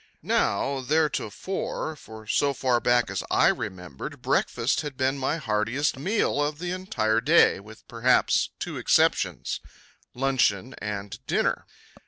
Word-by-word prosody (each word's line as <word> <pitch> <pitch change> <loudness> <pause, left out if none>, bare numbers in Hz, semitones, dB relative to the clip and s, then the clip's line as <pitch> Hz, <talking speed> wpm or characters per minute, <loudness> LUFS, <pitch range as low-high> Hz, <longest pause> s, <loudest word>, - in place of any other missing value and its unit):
Now, 135 +7 0
theretofore, 155 - -1
for 110 -6 -12
so 140 +5 +1
far 125 -2 +1
back 120 0 +2
as - - -2
I - - +4
remembered, 90 -7 -5
breakfast 120 +5 +1
had 145 -4 -7
been 130 +1 +1
my 135 +4 0
heartiest 115 +2 0
meal 180 +1 0
of 145 0 -1
the 175 +2 -4
entire 115 - 0
day, 155 - +5
with 110 +2 -14
perhaps 120 +2 +2
two - - -5
exceptions - - +1 0.6
luncheon 130 -3 +1
and 100 -1 -5
dinner. - - 0
130 Hz, 130 wpm, -26 LUFS, 110-145 Hz, 0.6 s, day